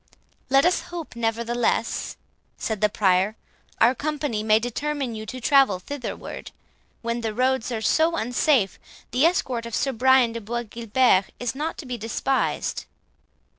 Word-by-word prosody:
"Let 275 +2 +5
us 360 - +3
hope, 340 -7 -7
nevertheless," 235 0 -1 0.4
said 220 -3 -3
the 210 - +4
Prior, 195 0 +2 0.4
"our 235 +3 +5
company 290 -5 -2
may 215 0 +4
determine 260 +3 -2
you 220 0 -7
to 255 - -6
travel 270 -6 +4
thitherward; 255 +8 -7 0.5
when 235 +1 -2
the 220 -2 -3
roads 255 0 +1
are 225 -2 -2
so 320 +8 +3
unsafe, 245 - +1 0.3
the 265 +6 +4
escort 255 -10 -1
of 235 - -4
Sir 275 - 0
Brian 260 0 +4
de 230 - -5
Bois 235 +3 -3
Guilbert 230 -2 +2
is 245 -2 -2
not 300 +4 -3
to 305 - -8
be 250 -2 -5
despised." 225 - -1
240 Hz, 150 wpm, -24 LUFS, 220-270 Hz, 0.5 s, Let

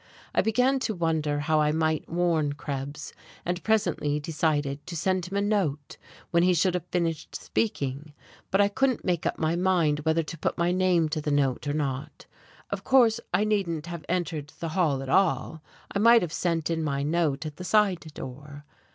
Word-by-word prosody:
I - - +3
began 250 +5 +2
to 220 -4 -2
wonder 155 -4 0
how 155 0 +2
I 150 0 +2
might 160 0 0
warn 165 -4 +1
Krebs, 145 0 -6 0.3
and 175 0 -2
presently 175 -9 +1
decided 145 -2 -1
to 170 - -6
send 185 +2 0
him 195 +2 -3
a - - +2
note 175 -9 -1 0.3
when 170 - +4
he 180 0 +4
should 180 +2 +2
have 180 -1 -3
finished 165 -3 -2
speaking 145 -8 -2 0.4
but 195 - +1
I 200 - +6
couldn't 255 +5 0
make 175 -3 0
up - - -2
my 160 +1 0
mind 175 -5 +2
whether 160 +2 +1
to 165 - -8
put - - -1
my 170 +1 +2
name 180 -3 +2
to 155 - -2
the 150 - -2
note 145 -1 +1
or 145 - 0
not. 145 0 -3 0.5
Of - - -3
course 240 -4 +4
I 210 - +2
needn't 190 -7 0
have 170 -2 -6
entered 165 -4 -2
the 165 - -3
hall 155 -6 +1
at 135 - -7
all: 160 -1 +1 0.3
I 200 - 0
might 230 +1 +6
have 165 -2 -4
sent 170 -2 -1
in 160 -1 -1
my 140 -2 -1
note 155 -1 0
at 150 -1 -6
the 180 - -7
side 200 -2 +3 0.2
door. 145 +3 -9
165 Hz, 195 wpm, -27 LUFS, 150-185 Hz, 0.5 s, I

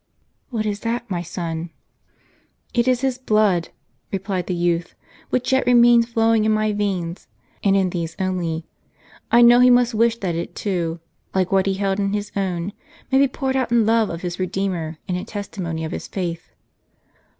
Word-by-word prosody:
" - - -46
What 225 -4 -2
is 205 -1 -2
that, 235 +2 -3
my 175 -2 -1
son? 170 -1 -4 0.5
" - - -36 0.3
"It 240 0 +2
is 255 -1 +2
his 260 -2 -1
blood," 210 -8 +2 0.4
replied 195 -2 -2
the 180 - -1
youth, 170 -1 -1 0.3
"which 255 0 0
yet 265 -1 +2
remains 240 -1 +6
flowing 225 -1 +2
in 215 - +2
my 215 0 +1
veins, 190 -4 -2 0.4
and 195 -1 +4
in 190 -2 +1
these 170 -2 -4
only. 175 -4 -2 0.7
I 240 0 +7
know 240 +1 +8
he 250 0 +7
must 245 -1 +4
wish 230 +1 +2
that 180 -3 -1
it 170 +1 -4
too, 170 -5 -2 0.4
like 185 -1 +1
what 195 0 +3
he 195 - +1
held 195 0 -1
in 200 0 0
his 205 0 -3
own, 190 -1 -2 0.4
may 265 - +5
be 275 - +5
poured 265 0 -2
out 260 -3 0
in 235 -2 +4
love 225 -1 +3
of 165 +1 -6
his 175 0 -3
Kedeemer, 185 -4 -2
and 180 - -1
in 180 - -5
testimony 180 -6 -4
of 160 - -5
his - - -5
faith." 170 -3 -4
195 Hz, 190 wpm, -22 LUFS, 175-230 Hz, 0.7 s, know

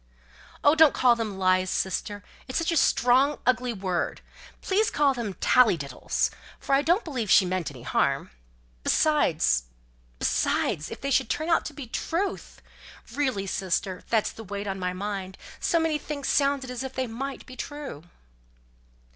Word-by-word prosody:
"Oh, 290 - +6
don't 320 -2 +6
call 245 -2 +5
them 220 -4 -4
lies, 185 0 +2
sister; 205 +3 -2 0.2
it's 255 - -2
such 330 0 0
a - - 0
strong, 265 0 +3
ugly 250 -1 +2
word. 190 -5 -2 0.4
Please 415 +3 +1
call 285 -2 +2
them 225 -6 -4
tallydiddles, 165 - +2 0.3
for - - -2
I 275 - +5
don't 345 +8 +2
believe 250 - -3
she 195 - +6
meant 180 -2 -2
any 130 -4 -12
harm. 120 - 0 0.5
Besides 165 - +2 0.5
besides 150 - 0
if 225 - -8
they 275 0 -2
should 225 - +2
turn 315 +2 -2
out 330 - +3
to 305 - -6
be 280 -2 -7
truth? 340 - -3 0.5
Really, 260 -9 -1
sister, 190 -1 -2
that's 220 -2 +1
the 225 - -10
weight 200 0 -5
on 195 -1 -3
my 180 0 -1
mind; 190 0 -5 0.2
so 335 - +2
many 320 -2 0
things 285 -2 -5
sounded 275 -2 +1
as 250 -1 -5
if 265 0 -5
they 260 - -1
might 265 +4 -6
be 255 - -11
true." 285 - -7
245 Hz, 165 wpm, -26 LUFS, 190-285 Hz, 0.5 s, Oh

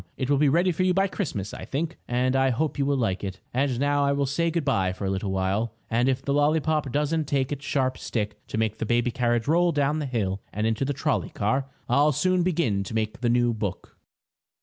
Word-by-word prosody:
It 130 +1 -1
will 140 - +4
be 150 -1 +4
ready 175 +5 +3
for 170 - -2
you 185 -1 +2
by 195 0 +3
Christmas, 140 - -3
I - - -7
think, 160 +4 -3
and 125 +2 +1
I 135 0 +3
hope 140 +4 -1
you 140 - +1
will 140 -1 +2
like 105 -7 -1
it. 95 -1 -5
And 130 -1 0
now 145 +1 +2
I 140 0 +2
will 140 0 +1
say 165 +5 0
good 165 -2 -1
bye 95 -9 +1
for 100 - -5
a 95 - 0
little 95 +1 -2
while, 95 +4 -1 0.2
and 120 +3 +2
if 130 0 -1
the 140 - 0
lollypop 150 -1 +1
doesn't 150 +3 0
take 135 -1 0
its 145 -1 -4
sharp 130 -3 0
stick 105 -3 -3
to - - -4
make 110 0 -1
the - - -1
baby 120 +1 +2
carriage 120 -2 0
roll 170 +3 +3
down 145 0 +1
the 150 - -2
hill 100 -6 -2
and 105 +2 -2
into 115 +4 0
the 145 - -1
trolley 135 - -1
car, 130 +7 -1 0.2
I'll 145 +4 +4
soon 185 +5 +2
begin 155 - +1
to 110 - -6
make 110 +1 -2
the 120 - +1
new 120 0 +3
book. 105 -4 -5
135 Hz, 240 wpm, -26 LUFS, 110-150 Hz, 0.2 s, will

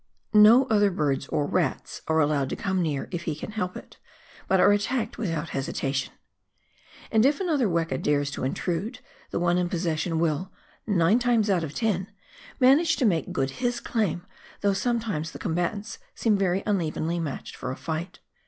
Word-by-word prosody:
No 220 +5 +8
other 205 -4 +3
birds 145 -6 -1
or 145 - 0
rats 160 -2 -1
are 160 0 +2
allowed 145 -3 +1
to - - -2
come 190 -1 -1
near 150 -5 -1
if 170 -2 -4
he - - -1
can 155 - -7
help 185 -4 -3
it, - - -13 0.5
but 190 - +3
are 205 - +6
attacked 220 +3 -1
without 165 -6 -2
hesitation. 135 0 -2 1.0
And 220 -1 +4
if 280 +2 +3
another 310 - +1
weka 165 -6 -1
dares 145 -1 +1
to - - -5
intrude, 180 - -2 0.3
the - - -2
one 175 +1 +2
in 175 -1 0
possession 165 -1 -1
will 165 +3 0 0.2
— - - -35
nine 195 +2 +3
times 235 -4 +2
out 180 -3 +1
of 150 -2 -6
ten 200 -5 0 0.3
— - - -20
manage 295 +6 +5
to 265 - 0
make 170 -8 +1
good 135 0 -1
his 245 -1 0
claim, 190 -6 -1 0.4
though 200 -1 +2
sometimes 210 -7 -1
the - - -7
com 160 - -3
batants 200 +6 -2 0.2
seem 220 -3 +2
very 195 -1 +1
unevenly 170 -4 -1
matched 155 -5 -5
for 130 - -5
a - - -4
fight. 165 +2 -5
180 Hz, 185 wpm, -26 LUFS, 160-215 Hz, 1.0 s, No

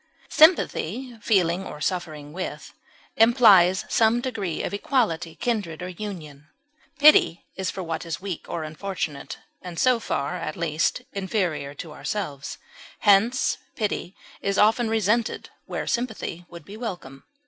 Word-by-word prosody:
Sympathy 260 - +3
(feeling 185 -4 +2
or 150 -5 -8
suffering 155 -4 -3
with) 185 +1 -6 0.4
implies 205 -6 +6
some 230 0 +3
degree 215 -9 -3
of - - -3
equality, 200 - 0
kindred, 200 -9 -2
or 180 - -4
union; 165 -7 -8 0.5
pity 290 - +6
is 190 -1 -2
for 190 - -5
what 165 -1 -3
is 165 -2 -4
weak 190 -4 -6
or 165 - -3
unfortunate, 155 -2 -5 0.2
and 180 -2 -8
so 255 -2 +4
far, 140 -9 -2
at 155 - -5
least, 165 +8 0
inferior 185 -8 -2
to 160 -1 -8
ourselves; 150 -6 -4 0.4
hence, 220 +5 +3 0.2
pity 200 -4 -2 0.3
is 200 0 -1
often 225 +2 +4
resented 225 +1 0 0.2
where - - -3
sympathy 220 -7 -3
would 170 -3 -11
be 200 - -10
welcome. 175 - -7
190 Hz, 135 wpm, -25 LUFS, 165-225 Hz, 0.5 s, implies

